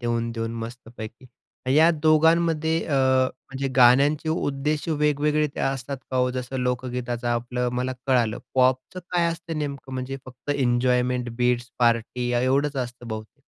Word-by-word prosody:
देऊन-देऊन 115 Hz, -1 st, -2 dB
मस्तपैकी. 115 Hz, 0 st, -10 dB, 0.5 s
या 160 Hz, +2 st, +7 dB
दोघांमध्ये 160 Hz, 0 st, +3 dB
अ, 150 Hz, -, -3 dB
म्हणजे 130 Hz, 0 st, +1 dB
गाण्यांचे 140 Hz, +5 st, +5 dB
उद्देश 150 Hz, 0 st, -1 dB
वेगवेगळे 150 Hz, 0 st, +2 dB
असतात 135 Hz, 0 st, -2 dB
का 130 Hz, -, -1 dB
हो? 125 Hz, 0 st, +2 dB
जसं 130 Hz, +1 st, -4 dB
लोकगीताचं 125 Hz, -1 st, -2 dB
आपलं 120 Hz, +1 st, -1 dB
मला 125 Hz, +1 st, -1 dB
कळालं. 120 Hz, -5 st, +2 dB, 0.2 s
पॉपचं 130 Hz, +7 st, +1 dB
काय 175 Hz, -1 st, +2 dB
असतं 165 Hz, -1 st, -5 dB
नेमकं 140 Hz, -3 st, -5 dB
म्हणजे 130 Hz, +1 st, -4 dB
फक्त 130 Hz, +3 st, -8 dB
एन्जॉयमेंट 125 Hz, -1 st, +1 dB
बीट्स, 125 Hz, 0 st, +1 dB
पार्टी 120 Hz, +1 st, +1 dB
एवढंच 135 Hz, +4 st, +1 dB
असतं 120 Hz, -1 st, -5 dB
बहुतेक? 110 Hz, +5 st, -7 dB
130 Hz, 130 wpm, -24 LUFS, 120-145 Hz, 0.5 s, या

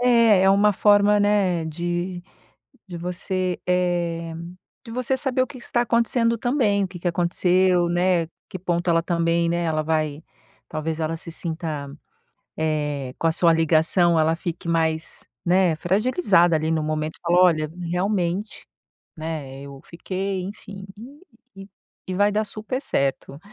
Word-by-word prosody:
é, 230 Hz, -5 st, +5 dB
é 190 Hz, -, +5 dB
uma 205 Hz, +2 st, +4 dB
forma, 205 Hz, +1 st, +4 dB
né, 195 Hz, -5 st, +2 dB
de 175 Hz, +2 st, -3 dB, 0.7 s
de 175 Hz, -2 st, -7 dB
você, 180 Hz, +1 st, -3 dB
eh, 175 Hz, -2 st, 0 dB, 0.5 s
de 230 Hz, -, -9 dB
você 255 Hz, +2 st, 0 dB
saber 260 Hz, -1 st, 0 dB
o 255 Hz, -, +1 dB
que 260 Hz, -, -11 dB
está 240 Hz, 0 st, -1 dB
acontecendo 235 Hz, 0 st, +1 dB
também, 225 Hz, -5 st, +1 dB
o -, -, -1 dB
que 180 Hz, -2 st, -10 dB
que 175 Hz, -, -3 dB
aconteceu, 175 Hz, +1 st, +2 dB
né, 175 Hz, -1 st, +1 dB, 0.2 s
que 185 Hz, -, -7 dB
ponto 175 Hz, 0 st, -1 dB
ela, 165 Hz, 0 st, +3 dB
também, 170 Hz, -1 st, +1 dB
né, 170 Hz, 0 st, 0 dB
ela 155 Hz, -2 st, 0 dB
vai 155 Hz, -1 st, -1 dB, 0.5 s
talvez 155 Hz, +1 st, -3 dB
ela 160 Hz, +1 st, -2 dB
se 165 Hz, +1 st, -8 dB
sinta, 160 Hz, -4 st, -5 dB, 0.7 s
eh, 150 Hz, -4 st, -2 dB
com 165 Hz, -, 0 dB
a -, -, +3 dB
sua 165 Hz, 0 st, +3 dB
ligação 165 Hz, +1 st, +3 dB
ela 160 Hz, +1 st, +2 dB
fique 170 Hz, -1 st, -6 dB
mais, 160 Hz, -1 st, -1 dB, 0.2 s
né, 180 Hz, -2 st, +3 dB
fragilizada 190 Hz, -, +2 dB
ali 155 Hz, +1 st, 0 dB
no 160 Hz, -1 st, 0 dB
momento, 155 Hz, 0 st, -3 dB
fala: 175 Hz, +1 st, +2 dB
"Olha, 155 Hz, -4 st, +3 dB, 0.2 s
realmente, 190 Hz, +2 st, -2 dB, 0.5 s
né, 155 Hz, -4 st, -6 dB
eu 140 Hz, -1 st, -10 dB
fiquei" 190 Hz, +2 st, -4 dB
enfim, 200 Hz, -1 st, -9 dB, 0.7 s
e 195 Hz, 0 st, -10 dB, 0.4 s
e 185 Hz, -, -2 dB
vai 205 Hz, +2 st, +2 dB
dar 215 Hz, +1 st, +1 dB
super 215 Hz, +5 st, -5 dB
certo. 140 Hz, -, -2 dB
175 Hz, 150 wpm, -23 LUFS, 160-200 Hz, 0.7 s, é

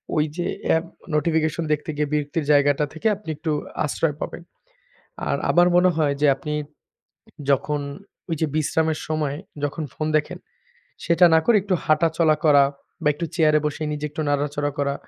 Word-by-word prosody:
ওই 150 Hz, -1 st, +3 dB
যে, 175 Hz, -, -1 dB, 0.2 s
app 160 Hz, +1 st, +2 dB, 0.3 s
notification 160 Hz, +1 st, +1 dB
দেখতে 150 Hz, -, -4 dB
গিয়ে 150 Hz, 0 st, 0 dB
বিরক্তির 150 Hz, +1 st, -1 dB
জায়গাটা 145 Hz, 0 st, +4 dB
থেকে 160 Hz, +8 st, -2 dB
আপনি 200 Hz, -5 st, -11 dB
একটু 155 Hz, 0 st, -2 dB, 0.3 s
আশ্রয় 150 Hz, 0 st, -1 dB
পাবেন। -, -, -5 dB, 0.9 s
আর -, -, +1 dB
আমার 175 Hz, 0 st, +5 dB
মনে 180 Hz, +1 st, +5 dB
হয় 150 Hz, -3 st, +2 dB
যে, 150 Hz, -, +5 dB
আপনি 150 Hz, +2 st, -5 dB, 1.0 s
যখন 145 Hz, +2 st, +1 dB, 0.5 s
ওই 165 Hz, -, 0 dB
যে, 160 Hz, -, +2 dB
বিশ্রামের 155 Hz, +1 st, 0 dB
সময় 150 Hz, -2 st, -1 dB, 0.3 s
যখন 145 Hz, +3 st, -3 dB
ফোন 155 Hz, -, -3 dB
দেখেন, 150 Hz, -, -2 dB, 0.7 s
সেটা 170 Hz, +1 st, +5 dB
না 160 Hz, -, +7 dB
করে 235 Hz, -, +5 dB
একটু 195 Hz, -2 st, +1 dB
হাঁটাচলা 160 Hz, 0 st, +3 dB
করা 145 Hz, -2 st, +7 dB, 0.4 s
বা -, -, +2 dB
একটু 170 Hz, -, -4 dB
চেয়ারে 155 Hz, -2 st, +4 dB
বসে 150 Hz, +1 st, -3 dB
নিজে 150 Hz, 0 st, -3 dB
একটু 155 Hz, +2 st, -5 dB
নাড়াচড়া 145 Hz, 0 st, -1 dB
করা, 140 Hz, 0 st, +1 dB
155 Hz, 165 wpm, -23 LUFS, 145-165 Hz, 1.0 s, না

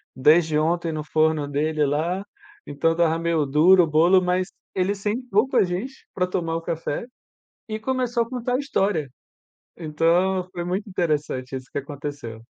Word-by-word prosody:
desde 155 Hz, +3 st, +4 dB
ontem 165 Hz, +1 st, 0 dB
no 155 Hz, -1 st, -4 dB
forno 155 Hz, -1 st, +1 dB
dele 150 Hz, +1 st, 0 dB
lá, 170 Hz, +7 st, -1 dB, 0.4 s
então 145 Hz, +3 st, 0 dB
estava 165 Hz, -1 st, +2 dB
meio 165 Hz, -3 st, +1 dB
duro 170 Hz, +6 st, +5 dB
o -, -, 0 dB
bolo, 170 Hz, +5 st, +4 dB
mas 180 Hz, +1 st, 0 dB, 0.2 s
ele 190 Hz, +2 st, 0 dB
sentou 215 Hz, +2 st, 0 dB
com -, -, -1 dB
a -, -, +6 dB
gente 195 Hz, +10 st, -5 dB
pra 180 Hz, -, 0 dB
tomar 165 Hz, -3 st, -2 dB
o 165 Hz, -, -2 dB
café, 165 Hz, +4 st, -3 dB, 0.6 s
e 215 Hz, 0 st, -4 dB
começou 245 Hz, 0 st, 0 dB
a 230 Hz, -, -12 dB
contar 250 Hz, 0 st, -3 dB
a -, -, +2 dB
história. 195 Hz, -, 0 dB, 0.7 s
Então 175 Hz, +4 st, +1 dB
foi 175 Hz, -1 st, -4 dB
muito 190 Hz, +4 st, -3 dB
interessante 150 Hz, -7 st, -2 dB
isso 130 Hz, 0 st, -8 dB
que -, -, -4 dB
aconteceu. 140 Hz, -5 st, -7 dB
170 Hz, 165 wpm, -23 LUFS, 150-190 Hz, 0.7 s, a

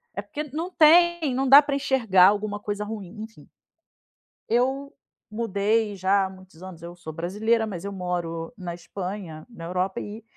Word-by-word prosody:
é -, -, -2 dB
porque 300 Hz, -, -6 dB
não 320 Hz, +6 st, -5 dB
tem 335 Hz, -2 st, +5 dB
não 270 Hz, +1 st, 0 dB
dá 275 Hz, +3 st, +10 dB
pra 285 Hz, -1 st, -2 dB
enxergar 230 Hz, -10 st, +4 dB
alguma 205 Hz, 0 st, 0 dB
coisa 205 Hz, 0 st, -4 dB
ruim, 210 Hz, -2 st, -7 dB
enfim. 220 Hz, 0 st, -11 dB, 1.0 s
Eu 265 Hz, +4 st, 0 dB, 0.4 s
mudei 215 Hz, -1 st, 0 dB
já 195 Hz, +1 st, +2 dB
há -, -, -5 dB
muitos 185 Hz, -3 st, -16 dB
anos. 185 Hz, -3 st, -10 dB
Eu 170 Hz, +1 st, -9 dB
sou 160 Hz, -3 st, -9 dB
brasileira, 215 Hz, +7 st, 0 dB
mas 195 Hz, -3 st, -6 dB
eu 200 Hz, -, -4 dB
moro 175 Hz, -1 st, -4 dB
na 180 Hz, -3 st, -5 dB
Espanha, 180 Hz, -2 st, -7 dB
na 165 Hz, -8 st, -10 dB
Europa 185 Hz, +2 st, -2 dB
e 215 Hz, +2 st, -8 dB
205 Hz, 170 wpm, -25 LUFS, 180-240 Hz, 1.0 s, dá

